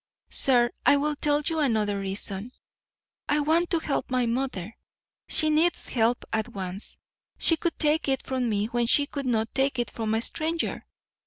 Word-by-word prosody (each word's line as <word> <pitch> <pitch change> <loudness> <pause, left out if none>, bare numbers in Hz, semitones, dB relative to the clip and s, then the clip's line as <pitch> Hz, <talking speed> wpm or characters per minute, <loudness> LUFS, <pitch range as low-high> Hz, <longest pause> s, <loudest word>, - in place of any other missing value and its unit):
Sir, 245 -2 +4
I 285 - +5
will 300 +1 -1
tell 295 0 +1
you 325 0 0
another 215 -8 +1
reason: 195 +3 -5 0.8
I 295 - +2
want 320 +4 +2
to 340 - +2
help 310 -3 -2
my 250 -1 +1
mother; 230 -4 -3 0.5
she 310 -1 +5
needs 325 +3 +1
help 235 0 +1
at 220 +1 -1
once. 190 -2 -6 0.4
She 330 - +4
could 335 +1 -3
take 305 0 +1
it 265 -1 -1
from 255 -2 -1
me 205 -1 0
when 235 +1 -1
she 285 +4 +4
could 280 -2 -5
not 225 -2 0
take 270 0 0
it 240 - -2
from 220 -1 -2
a 225 - 0
stranger. 325 +4 -2
255 Hz, 175 wpm, -26 LUFS, 225-300 Hz, 0.8 s, I